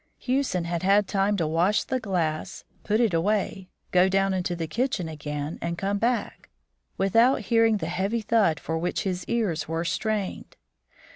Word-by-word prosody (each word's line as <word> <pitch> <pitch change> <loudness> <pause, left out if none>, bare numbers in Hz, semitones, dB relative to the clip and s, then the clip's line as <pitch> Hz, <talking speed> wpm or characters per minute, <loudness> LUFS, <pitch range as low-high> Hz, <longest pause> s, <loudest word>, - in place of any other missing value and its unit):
Hewson 255 -9 0
had 170 0 -2
had 200 +1 +3
time 200 +1 +1
to 165 - 0
wash 170 +7 +2
the 260 - -2
glass, 170 -8 -2 0.2
put 215 +1 +1
it 230 -6 +2
away, 190 +1 0 0.2
go 180 +1 +4
down 195 0 +2
into 180 -1 -1
the 165 -1 -3
kitchen 215 - -1
again, 150 -1 -5
and 170 0 -3
come 200 +2 -1
back, 235 +2 -1 0.5
without 230 +7 +3
hearing 225 -2 +3
the 170 - -4
heavy 190 +7 -1
thud 215 -7 +2
for 160 0 -3
which 175 +2 -2
his 185 -2 -2
ears 210 -9 -1
were 165 +2 -2
strained. 215 +1 -3
195 Hz, 165 wpm, -26 LUFS, 170-215 Hz, 0.5 s, go